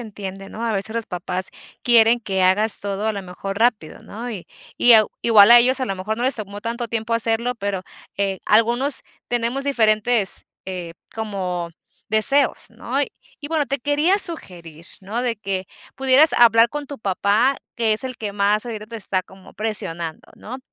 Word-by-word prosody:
entiende, 195 Hz, -3 st, -8 dB
¿no? 225 Hz, -, -7 dB
A 230 Hz, -, 0 dB
veces 200 Hz, +2 st, -3 dB
los 230 Hz, -1 st, -3 dB
papás 180 Hz, +1 st, -4 dB, 0.3 s
quieren 235 Hz, -1 st, +5 dB
que 190 Hz, -4 st, -1 dB
hagas 205 Hz, +4 st, +3 dB
todo, 200 Hz, +1 st, -3 dB
a 220 Hz, -, 0 dB
lo 200 Hz, -1 st, -5 dB
mejor, 195 Hz, +2 st, -6 dB
rápido, 225 Hz, -9 st, 0 dB
¿no? 240 Hz, +3 st, -8 dB
Y 195 Hz, -6 st, -7 dB, 0.3 s
y, 245 Hz, -, +6 dB
ah, 215 Hz, -1 st, +7 dB, 0.2 s
igual 215 Hz, -2 st, +7 dB
a 240 Hz, -, +10 dB
ellos, 255 Hz, +2 st, +2 dB
a 260 Hz, -, -1 dB
lo 195 Hz, -, -2 dB
mejor, 210 Hz, +4 st, -3 dB
no 245 Hz, -, -1 dB
les 265 Hz, -, +1 dB
tomó 205 Hz, -2 st, -7 dB
tanto 235 Hz, +2 st, -4 dB
tiempo 230 Hz, 0 st, -2 dB
hacerlo, 230 Hz, +2 st, 0 dB
pero, 200 Hz, -3 st, -3 dB, 0.4 s
eh, 195 Hz, -1 st, -1 dB
algunos 240 Hz, +6 st, +2 dB, 0.3 s
tenemos 240 Hz, +3 st, -1 dB
diferentes, 220 Hz, -4 st, +2 dB, 0.2 s
eh, 180 Hz, -3 st, -6 dB, 0.2 s
como 185 Hz, -6 st, -4 dB, 0.4 s
deseos, 270 Hz, +6 st, +2 dB
¿no? -, -, -3 dB, 0.4 s
Y 290 Hz, -, -7 dB
bueno, 315 Hz, -2 st, 0 dB
te 275 Hz, +2 st, -2 dB
quería 295 Hz, +9 st, +1 dB
sugerir, 170 Hz, -, -3 dB
¿no?, 215 Hz, +6 st, -4 dB
de 235 Hz, -3 st, -1 dB
que 190 Hz, -2 st, -4 dB, 0.3 s
pudieras 270 Hz, +4 st, +5 dB
hablar 230 Hz, -1 st, +6 dB
con 295 Hz, +1 st, -6 dB
tu 285 Hz, -3 st, -8 dB
papá, 210 Hz, +6 st, +1 dB, 0.2 s
que 225 Hz, -2 st, +2 dB
es 215 Hz, -, -7 dB
el 255 Hz, -2 st, -5 dB
que 210 Hz, -2 st, -5 dB
más 205 Hz, +2 st, +1 dB
ahorita 215 Hz, -2 st, -6 dB
te 230 Hz, -, -8 dB
está 190 Hz, -3 st, -1 dB
como 190 Hz, 0 st, -17 dB
presionando, 170 Hz, -7 st, -3 dB
¿no? 250 Hz, +4 st, -8 dB
220 Hz, 180 wpm, -21 LUFS, 195-240 Hz, 0.4 s, a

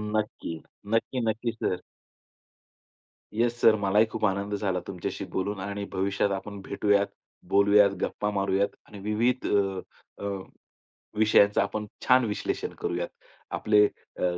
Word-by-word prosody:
नक्की. 105 Hz, -5 st, -2 dB, 0.4 s
नक्की, 125 Hz, +2 st, 0 dB
नक्की 115 Hz, +2 st, -1 dB
सर. 95 Hz, -5 st, -2 dB, 1.5 s
Yes 120 Hz, +2 st, 0 dB
sir. 110 Hz, -, +7 dB
मलाही 105 Hz, +2 st, +4 dB
खूप 110 Hz, -1 st, -1 dB
आनंद 100 Hz, +1 st, 0 dB
झाला 95 Hz, -3 st, -1 dB
तुमच्याशी 90 Hz, -2 st, -4 dB
बोलून 95 Hz, +1 st, -1 dB
आणि 100 Hz, +1 st, -4 dB
भविष्यात 100 Hz, +1 st, 0 dB
आपण 100 Hz, +1 st, -4 dB
भेटूयात, 100 Hz, +1 st, +2 dB, 0.4 s
बोलूयात, 100 Hz, +1 st, +5 dB
गप्पा 105 Hz, -, -1 dB
मारूयात 100 Hz, 0 st, +1 dB, 0.2 s
आणि 105 Hz, -, -11 dB
विविध 115 Hz, +5 st, 0 dB
अ, 95 Hz, -2 st, +1 dB, 0.4 s
अ, -, -, -2 dB, 0.9 s
विषयांचं 105 Hz, -1 st, +5 dB
आपण 105 Hz, +1 st, -2 dB, 0.2 s
छान 130 Hz, -1 st, +6 dB
विश्लेषण 105 Hz, -2 st, -2 dB
करूयात. 85 Hz, 0 st, -1 dB, 0.4 s
आपले 105 Hz, -1 st, +4 dB
अ, -, -, -8 dB
100 Hz, 125 wpm, -27 LUFS, 100-110 Hz, 1.5 s, सर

